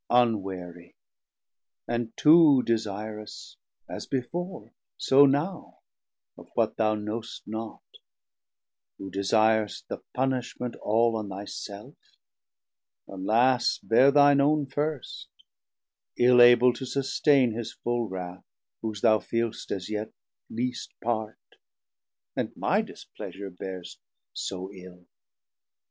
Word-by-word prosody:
Unwarie, 95 Hz, -8 st, 0 dB, 0.9 s
and 120 Hz, -1 st, -2 dB
too 150 Hz, -4 st, +6 dB
desirous, 105 Hz, -1 st, -4 dB, 0.3 s
as -, -, -7 dB
before, 135 Hz, -, -4 dB, 0.2 s
So 140 Hz, +1 st, +6 dB
now 155 Hz, +7 st, -2 dB, 0.5 s
of -, -, -15 dB
what -, -, +1 dB
thou 110 Hz, -1 st, +2 dB
knowst 110 Hz, +2 st, -6 dB
not, 110 Hz, +1 st, -6 dB, 1.1 s
who 95 Hz, -1 st, -8 dB
desir'st 110 Hz, +2 st, +1 dB
The -, -, -4 dB, 0.2 s
punishment 125 Hz, -2 st, -2 dB
all 115 Hz, +2 st, +2 dB
on 105 Hz, -2 st, -5 dB
thy 100 Hz, +1 st, -6 dB
self; 100 Hz, 0 st, -8 dB, 1.1 s
alas, 115 Hz, +6 st, +2 dB
Beare 125 Hz, +4 st, +4 dB
thine 140 Hz, 0 st, +5 dB
own 150 Hz, +1 st, +2 dB
first, 145 Hz, 0 st, -4 dB, 0.9 s
ill 125 Hz, 0 st, +6 dB
able 120 Hz, +1 st, +7 dB
to 125 Hz, -, -8 dB
sustaine 135 Hz, 0 st, +2 dB
950 110 Hz, -, -6 dB
His 115 Hz, -, -5 dB
full 120 Hz, -2 st, -1 dB
wrauth 90 Hz, -1 st, -7 dB, 0.4 s
whose 110 Hz, -3 st, -4 dB
thou 110 Hz, 0 st, +5 dB
feelst 115 Hz, +3 st, -3 dB
as 95 Hz, -2 st, -4 dB
yet 110 Hz, 0 st, -4 dB, 0.4 s
lest 125 Hz, +2 st, -4 dB
part, 110 Hz, -2 st, -2 dB, 1.0 s
And -, -, -3 dB
my -, -, +2 dB
displeasure 100 Hz, 0 st, -9 dB
bearst 90 Hz, 0 st, -8 dB, 0.3 s
so 95 Hz, +1 st, -5 dB
ill. 90 Hz, -2 st, -13 dB
115 Hz, 110 wpm, -27 LUFS, 100-125 Hz, 1.1 s, able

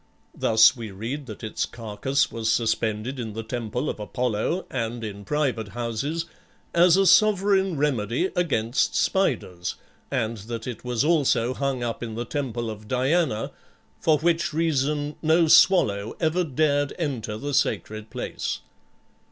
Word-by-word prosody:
Thus 110 Hz, 0 st, +5 dB
we 115 Hz, -3 st, -6 dB
read 120 Hz, +9 st, -5 dB
that 110 Hz, 0 st, -9 dB
its 110 Hz, -, -2 dB
carcass 115 Hz, +4 st, -1 dB
was 110 Hz, -1 st, -1 dB
suspended 115 Hz, +2 st, -1 dB
in 110 Hz, -3 st, -4 dB
the 115 Hz, +1 st, -5 dB
temple 120 Hz, +4 st, -3 dB
of -, -, -3 dB
Apollo, 125 Hz, -, -1 dB
and 115 Hz, -2 st, -3 dB
in 100 Hz, -2 st, -6 dB
private 135 Hz, -5 st, -1 dB
houses, 120 Hz, +9 st, -3 dB, 0.5 s
as 175 Hz, +1 st, +5 dB
a 195 Hz, -, +4 dB
sovereign 195 Hz, -2 st, +4 dB
remedy 135 Hz, -, 0 dB
against 130 Hz, -9 st, +1 dB
spiders, 105 Hz, -, 0 dB, 0.3 s
and 110 Hz, +1 st, -1 dB
that 115 Hz, +2 st, -6 dB
it 125 Hz, -3 st, -6 dB
was 125 Hz, +1 st, 0 dB
also 140 Hz, -7 st, +2 dB
hung 135 Hz, -2 st, -2 dB
up 115 Hz, -1 st, -3 dB
in 115 Hz, -2 st, -5 dB
the 120 Hz, +1 st, -3 dB
temple 120 Hz, -3 st, -3 dB
of 105 Hz, 0 st, -10 dB
Diana, 130 Hz, 0 st, +1 dB, 0.5 s
for 155 Hz, -2 st, +3 dB
which 165 Hz, +1 st, +1 dB
reason 150 Hz, -2 st, 0 dB
no 160 Hz, +1 st, +4 dB
swallow 110 Hz, -, +4 dB
ever 170 Hz, +2 st, +1 dB
dared 145 Hz, -1 st, +1 dB
enter 125 Hz, -10 st, -3 dB
the 145 Hz, +5 st, -4 dB
sacred 110 Hz, -4 st, -1 dB
place. -, -, -4 dB
125 Hz, 145 wpm, -25 LUFS, 110-155 Hz, 0.5 s, Thus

